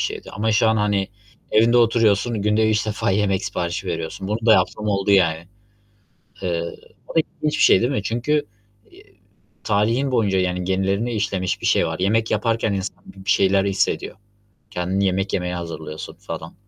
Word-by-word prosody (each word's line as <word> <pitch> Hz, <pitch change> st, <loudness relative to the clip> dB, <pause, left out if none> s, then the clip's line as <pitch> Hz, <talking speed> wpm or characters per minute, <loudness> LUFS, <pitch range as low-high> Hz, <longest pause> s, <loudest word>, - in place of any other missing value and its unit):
şeydi -, -, -4 dB
ama 110 Hz, +1 st, 0 dB
şu 110 Hz, +1 st, +3 dB
an, 110 Hz, -, +2 dB
hani, 105 Hz, -2 st, 0 dB, 0.4 s
evinde 115 Hz, +2 st, +4 dB
oturuyorsun, 115 Hz, -2 st, +2 dB
günde 110 Hz, +1 st, +2 dB
3 105 Hz, 0 st, 0 dB
defa 105 Hz, -2 st, -1 dB
yemek 95 Hz, -1 st, +1 dB
siparişi 90 Hz, +2 st, -3 dB
veriyorsun. 85 Hz, +2 st, -4 dB
Bunu 110 Hz, +2 st, -2 dB
da 115 Hz, -, +7 dB
yaptığım 105 Hz, 0 st, +1 dB
oldu, 100 Hz, -1 st, 0 dB
yani. 85 Hz, -4 st, +3 dB, 1.0 s
Eee, 85 Hz, -3 st, -1 dB, 0.4 s
o -, -, -10 dB
da -, -, +6 dB
ilginç 150 Hz, -1 st, -2 dB
bir -, -, +3 dB
şey, -, -, +6 dB
değil 120 Hz, +3 st, +1 dB
mi? 120 Hz, -8 st, -1 dB
Çünkü, 120 Hz, +8 st, 0 dB, 0.5 s
iii, -, -, -21 dB, 0.4 s
tarihin 115 Hz, +6 st, +1 dB
boyunca, 100 Hz, -6 st, +2 dB
yani, 90 Hz, 0 st, -1 dB
genlerine 95 Hz, +5 st, 0 dB
işlemiş 100 Hz, -4 st, -2 dB
bir -, -, -4 dB
şey -, -, +3 dB
var. 80 Hz, +1 st, -4 dB
Yemek 110 Hz, +4 st, +1 dB
yaparken 110 Hz, -1 st, 0 dB
insan 95 Hz, -1 st, -5 dB
bi 95 Hz, -1 st, -14 dB
bir -, -, -4 dB
şeyler 95 Hz, 0 st, +3 dB
hissediyor. 100 Hz, -1 st, -1 dB, 0.5 s
Kendini 95 Hz, +3 st, -1 dB
yemek 95 Hz, +1 st, 0 dB
yemeye 90 Hz, -1 st, -1 dB
hazırlıyorsun, 80 Hz, -3 st, -7 dB
falan. 80 Hz, -, -8 dB
100 Hz, 175 wpm, -21 LUFS, 95-110 Hz, 1.0 s, da